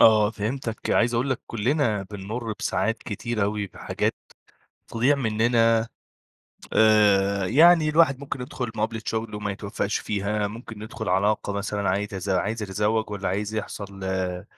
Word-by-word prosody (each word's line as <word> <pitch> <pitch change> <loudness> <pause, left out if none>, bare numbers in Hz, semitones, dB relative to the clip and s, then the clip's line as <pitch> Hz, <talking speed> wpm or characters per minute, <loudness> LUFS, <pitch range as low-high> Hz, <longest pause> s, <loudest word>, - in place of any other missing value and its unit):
آه، 110 -1 +6
فهمتك. 115 +1 -4
عايز 120 0 +3
أقول 130 +3 0
لك 130 - -1
كُلّنا 115 -2 0
بنمُرّ 105 +4 -5
بساعات 115 0 0
كتير 110 +1 -3
أوي 105 0 -1
بحاجات - - -2 0.7
تضيع 125 +6 +2
مننا. 115 -1 +2 0.8
آآ، 100 -3 +4
يعني 160 - +6
الواحد 150 -3 +4
ممكن 140 -2 -5
يدخل 125 0 -4
مقابلة 110 +1 -2
شغل 110 -1 -2
وما 105 0 -3
يتوفّقش 100 0 -2
فيها، 105 0 -1
ممكن 110 0 -8
يدخل 110 0 -6
علاقة 100 +3 +1
مثلًا 100 0 -2
عايز 100 +2 +1
يتز 100 -1 -6
عايز 100 +4 0
يتزوج 105 +2 0
والّا 100 -1 -3
عايز 105 +3 -2
يحصل 100 -2 -5
آآ 95 -1 -2
110 Hz, 145 wpm, -25 LUFS, 100-115 Hz, 0.8 s, آه